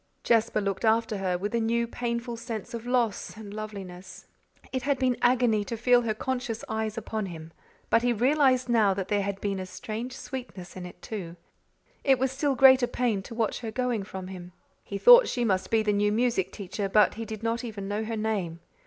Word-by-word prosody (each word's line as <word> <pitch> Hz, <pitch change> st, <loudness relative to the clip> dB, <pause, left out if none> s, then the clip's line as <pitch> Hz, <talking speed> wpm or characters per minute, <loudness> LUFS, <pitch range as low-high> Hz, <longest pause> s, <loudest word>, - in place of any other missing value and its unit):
Jasper 225 Hz, -2 st, +2 dB
looked 200 Hz, +1 st, -2 dB
after 225 Hz, -2 st, +2 dB
her 185 Hz, -2 st, 0 dB
with 205 Hz, +4 st, -4 dB
a 235 Hz, -, +2 dB
new, 235 Hz, +1 st, +1 dB
painful 235 Hz, 0 st, -3 dB
sense 230 Hz, 0 st, -6 dB
of 235 Hz, +1 st, -6 dB
loss 240 Hz, -4 st, 0 dB
and 205 Hz, -2 st, -9 dB
loveliness. 195 Hz, -4 st, -8 dB, 0.5 s
It 260 Hz, -, -1 dB
had 280 Hz, +2 st, 0 dB
been 255 Hz, -1 st, +1 dB
agony 245 Hz, -4 st, +3 dB
to 230 Hz, -, -4 dB
feel 245 Hz, +1 st, +4 dB
her 220 Hz, -2 st, -1 dB
conscious 245 Hz, -1 st, -3 dB
eyes 220 Hz, -1 st, -3 dB
upon 215 Hz, -3 st, -3 dB
him, 165 Hz, -2 st, -9 dB, 0.4 s
but 230 Hz, -, +5 dB
he 245 Hz, 0 st, +2 dB
realized 255 Hz, +2 st, +3 dB
now 220 Hz, -5 st, +3 dB
that 195 Hz, -1 st, -4 dB
there 205 Hz, -1 st, +2 dB
had 200 Hz, 0 st, -3 dB
been 200 Hz, -2 st, -1 dB
a 185 Hz, -, -4 dB
strange 220 Hz, +6 st, -6 dB
sweetness 245 Hz, -9 st, -8 dB
in 180 Hz, -1 st, -6 dB
it, -, -, -15 dB
too. 180 Hz, -6 st, -6 dB, 0.7 s
It 270 Hz, -2 st, +4 dB
was 260 Hz, +1 st, 0 dB
still 275 Hz, +1 st, 0 dB
greater 260 Hz, -1 st, +7 dB
pain 235 Hz, -6 st, 0 dB
to 230 Hz, -, -10 dB
watch 225 Hz, -2 st, -1 dB
her 230 Hz, -, -5 dB
going 245 Hz, -1 st, -1 dB
from 190 Hz, -1 st, -7 dB
him. 180 Hz, -1 st, -9 dB, 0.3 s
He 200 Hz, -, -5 dB
thought 485 Hz, -, +8 dB
she 245 Hz, -, -1 dB
must 190 Hz, -4 st, 0 dB
be 225 Hz, -1 st, +2 dB
the 210 Hz, -1 st, +1 dB
new 205 Hz, 0 st, +2 dB
music 220 Hz, -4 st, +1 dB
teacher 200 Hz, 0 st, -4 dB
but 210 Hz, +1 st, +4 dB
he 225 Hz, -, -5 dB
did 220 Hz, -1 st, -7 dB
not 230 Hz, +2 st, -1 dB
even 205 Hz, -4 st, -6 dB
know 205 Hz, +2 st, -2 dB
her 225 Hz, 0 st, -3 dB
name. 200 Hz, -7 st, -2 dB
220 Hz, 210 wpm, -27 LUFS, 200-245 Hz, 0.7 s, thought